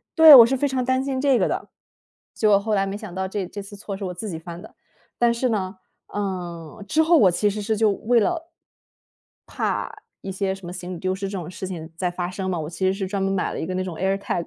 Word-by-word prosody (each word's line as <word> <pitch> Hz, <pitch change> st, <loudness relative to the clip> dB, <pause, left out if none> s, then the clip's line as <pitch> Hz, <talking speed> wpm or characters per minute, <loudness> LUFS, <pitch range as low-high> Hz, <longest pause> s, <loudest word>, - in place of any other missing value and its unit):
对， 320 Hz, -2 st, +10 dB
我 240 Hz, -3 st, +11 dB
是 265 Hz, +3 st, 0 dB
非 285 Hz, -, +1 dB
常 260 Hz, -2 st, -1 dB
担 260 Hz, +1 st, +1 dB
心 265 Hz, -1 st, -2 dB
这 275 Hz, -4 st, +3 dB
个 -, -, +2 dB
的， -, -, -3 dB, 0.7 s
结 215 Hz, -, +2 dB
果 200 Hz, -1 st, +6 dB
后 215 Hz, +2 st, -1 dB
来 195 Hz, -1 st, +2 dB
没 195 Hz, +1 st, -4 dB
想 205 Hz, -4 st, -9 dB
到 190 Hz, 0 st, -2 dB
这 195 Hz, -1 st, -3 dB
这 205 Hz, +3 st, -7 dB
次 200 Hz, +1 st, -11 dB
错 200 Hz, -1 st, -6 dB
是 195 Hz, -, -6 dB
我 180 Hz, -, -5 dB
自 215 Hz, +5 st, -6 dB
己 165 Hz, -4 st, -5 dB
犯 170 Hz, +1 st, -9 dB
的。 -, -, -14 dB, 0.4 s
但 240 Hz, -1 st, +4 dB
是 235 Hz, +2 st, 0 dB
呢， 195 Hz, -4 st, -2 dB, 0.3 s
呃， 180 Hz, -3 st, -5 dB
之 315 Hz, +7 st, +2 dB
后 335 Hz, +2 st, +4 dB
我 200 Hz, -, +6 dB
其 175 Hz, +4 st, +1 dB
实 210 Hz, +1 st, -3 dB
是 220 Hz, +2 st, 0 dB
就 215 Hz, 0 st, +3 dB
为 230 Hz, +4 st, +2 dB
了 290 Hz, -, +1 dB
怕 330 Hz, -1 st, -7 dB, 1.8 s
一 -, -, -2 dB
些 190 Hz, 0 st, -1 dB
什 195 Hz, -1 st, -10 dB
么 175 Hz, -, -6 dB
行 180 Hz, 0 st, -6 dB
李 -, -, -6 dB
丢 185 Hz, +1 st, -1 dB
失 195 Hz, 0 st, -4 dB
这 195 Hz, -, -4 dB
种 175 Hz, -2 st, -6 dB
事 185 Hz, +1 st, -6 dB
情 165 Hz, -4 st, -7 dB
再 180 Hz, +1 st, -1 dB
发 175 Hz, 0 st, -3 dB
生 190 Hz, +1 st, -4 dB
呢， 175 Hz, -, -2 dB
我 150 Hz, -, -5 dB
其 175 Hz, +3 st, -3 dB
实 190 Hz, -, +3 dB
是 195 Hz, -1 st, -3 dB
专 195 Hz, 0 st, -2 dB
门 195 Hz, -, 0 dB
买 195 Hz, -2 st, -1 dB
了 -, -, -4 dB
一 -, -, -3 dB
个 185 Hz, -, -4 dB
那 185 Hz, -, -1 dB
种 180 Hz, -3 st, -6 dB
airtag。 190 Hz, 0 st, -1 dB
195 Hz, 310 characters per minute, -23 LUFS, 185-220 Hz, 1.8 s, 我